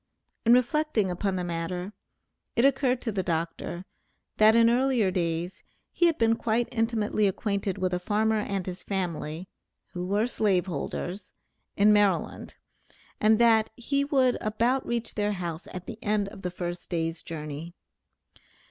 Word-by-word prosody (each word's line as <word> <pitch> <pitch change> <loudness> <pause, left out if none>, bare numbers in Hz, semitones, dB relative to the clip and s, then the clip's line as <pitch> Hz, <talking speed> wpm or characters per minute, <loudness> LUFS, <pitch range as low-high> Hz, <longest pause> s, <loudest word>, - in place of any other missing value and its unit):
In 235 - +8
reflecting 250 -5 +1
upon 190 +2 -1
the 180 - -2
matter, 175 +3 -4 0.6
it 235 - +4
occurred 265 -2 +2
to 225 - -1
the 195 -2 -1
doctor, 170 +1 -3 0.5
that 215 +1 +6
in 230 0 +6
earlier 240 -4 +2
days, 170 0 -2 0.3
he 345 - +3
had 330 - +1
been 225 0 +3
quite 230 +1 0
intimately 225 -3 +1
acquainted 200 0 -1
with 185 -1 -1
a 180 - 0
farmer 215 +3 +1
and 195 -3 -2
his 180 -1 -6
family 175 -3 -3 0.5
(who 180 0 -4
were 205 +3 +2
slave 200 -7 +1
holders), 185 +3 -5 0.4
in 210 +1 +6
Maryland, 205 -2 +1 0.6
and 215 +1 +4
that 225 -2 +4
he 280 +3 0
would 265 -3 +2
about 235 +5 +1
reach 235 -1 -2
their 210 0 0
house 175 -3 -5
at 185 -1 -7
the 230 -1 -8
end 210 -1 +1
of 195 - -12
the 180 - -2
first 175 0 -5
day's 165 -1 -2
journey. 155 +1 -7
205 Hz, 155 wpm, -27 LUFS, 180-230 Hz, 0.6 s, In